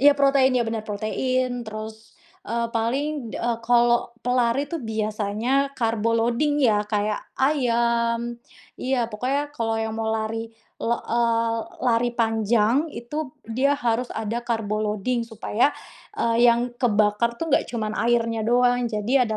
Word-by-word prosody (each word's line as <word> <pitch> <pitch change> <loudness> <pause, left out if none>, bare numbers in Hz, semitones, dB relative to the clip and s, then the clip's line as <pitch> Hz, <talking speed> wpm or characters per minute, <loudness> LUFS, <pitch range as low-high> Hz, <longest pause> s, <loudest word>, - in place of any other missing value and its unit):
iya 290 +2 +7
protein, 275 -1 +4
iya - - +2
benar 225 -1 -2
protein. 245 +4 -1
Terus, 220 +1 -8 0.3
eee, 235 0 -1
paling, 255 +2 -1
eee, 235 -1 -1
kalau 240 0 +3
pelari 250 +2 +1
tuh 335 - -3
biasanya 220 +5 -1
karbo 230 -1 +1
loading 240 +6 +1
ya, 215 -3 +4
kayak 210 0 -1 0.2
ayam 235 -3 +1 0.4
iya 255 -3 0
pokoknya 275 +7 -2
kalau 225 -1 0
yang 220 0 -3
mau 225 0 -2
lari, 225 +1 -2 0.3
la 235 +1 +1
eee, 230 -1 +1 0.3
lari 240 -1 +2
panjang, 225 +4 +2
itu 290 +3 -5 0.2
dia 260 +5 +2
harus 245 -2 0
ada 225 +2 -2
karbo 220 -3 -1
loading 215 +4 -1
supaya 225 +4 0 0.4
eee, 230 +1 +2
yang 240 +1 +2
kebakar 215 0 +2
tuh 330 - -2
enggak - - +3
cuman 215 -3 -2
airnya 230 0 +1
doang. 245 +1 +3
Jadi 220 +4 0
ada 220 -3 +1
235 Hz, 140 wpm, -24 LUFS, 220-250 Hz, 0.4 s, iya